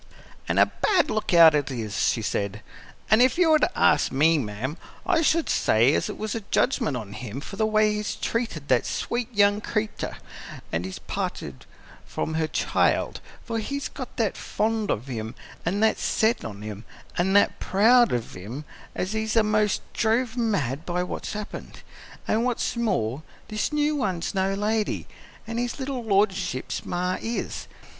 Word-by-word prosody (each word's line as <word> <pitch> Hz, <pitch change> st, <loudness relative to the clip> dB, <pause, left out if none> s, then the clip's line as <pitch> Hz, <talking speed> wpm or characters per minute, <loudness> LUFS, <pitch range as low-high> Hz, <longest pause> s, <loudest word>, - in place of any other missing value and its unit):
"An' -, -, +1 dB
a -, -, +7 dB
bad 375 Hz, -5 st, +1 dB
lookout 170 Hz, -7 st, +6 dB
it 145 Hz, -2 st, +1 dB
is," 110 Hz, -6 st, -4 dB
she 115 Hz, +4 st, +1 dB
said. 100 Hz, 0 st, -2 dB, 0.5 s
"An' 215 Hz, +2 st, +6 dB
if 255 Hz, +2 st, +4 dB
you 345 Hz, -3 st, +4 dB
were 310 Hz, -, +6 dB
to -, -, +3 dB
ask -, -, +4 dB
me, 155 Hz, +4 st, +4 dB
ma'am, 120 Hz, -, -4 dB, 0.3 s
I 320 Hz, -, +3 dB
should 330 Hz, 0 st, +2 dB
say -, -, +3 dB
as -, -, 0 dB
it -, -, -6 dB
was 215 Hz, -1 st, -3 dB
a 230 Hz, -, -3 dB
judgment 215 Hz, -, +1 dB
on 105 Hz, -4 st, -7 dB
him 110 Hz, +3 st, -6 dB
for 175 Hz, +7 st, -8 dB
the 220 Hz, +1 st, +1 dB
way 215 Hz, 0 st, +3 dB
he's 210 Hz, 0 st, -2 dB
treated 225 Hz, -, -3 dB
that 125 Hz, -2 st, +2 dB
sweet 240 Hz, 0 st, -2 dB
young 205 Hz, -1 st, +3 dB
cre'tur' 215 Hz, -1 st, -3 dB, 0.6 s
as 85 Hz, +1 st, 0 dB
he 95 Hz, 0 st, -5 dB
parted 65 Hz, -, -4 dB, 0.4 s
from 160 Hz, -, -3 dB
her 160 Hz, 0 st, 0 dB
child, -, -, +1 dB, 0.2 s
for 230 Hz, -1 st, -2 dB
he's 280 Hz, +6 st, -3 dB
got -, -, -8 dB
that -, -, +1 dB
fond 220 Hz, -1 st, -1 dB
of 110 Hz, -, -1 dB
him 115 Hz, -2 st, -5 dB, 0.3 s
an' 200 Hz, +4 st, 0 dB
that 220 Hz, -, +3 dB
set 220 Hz, +2 st, +1 dB
on 105 Hz, -2 st, -7 dB
him 105 Hz, 0 st, -7 dB, 0.4 s
an' 190 Hz, +2 st, +2 dB
that 200 Hz, -, +4 dB
proud 230 Hz, +5 st, +5 dB
of 120 Hz, -2 st, -2 dB
him 115 Hz, +11 st, -7 dB, 0.3 s
as 185 Hz, +3 st, -2 dB
he's 220 Hz, 0 st, -1 dB
a'most 215 Hz, -2 st, +2 dB
drove 230 Hz, +1 st, +1 dB
mad 175 Hz, -, 0 dB
by 180 Hz, +1 st, -1 dB
what's 180 Hz, -, -5 dB
happened. 210 Hz, 0 st, -7 dB, 0.5 s
An' 220 Hz, -, +2 dB
what's 245 Hz, 0 st, -1 dB
more, 140 Hz, -, 0 dB, 0.3 s
this 215 Hz, +5 st, -1 dB
new 300 Hz, 0 st, +1 dB
one's 185 Hz, -10 st, -1 dB
no 195 Hz, 0 st, +1 dB
lady, 210 Hz, +1 st, -1 dB, 0.4 s
as 230 Hz, +1 st, -4 dB
his 245 Hz, +3 st, -2 dB
little 265 Hz, -2 st, -3 dB
lordship's 195 Hz, -, 0 dB
ma 180 Hz, +1 st, -1 dB
is. 230 Hz, +1 st, -4 dB
205 Hz, 170 wpm, -25 LUFS, 140-225 Hz, 0.6 s, a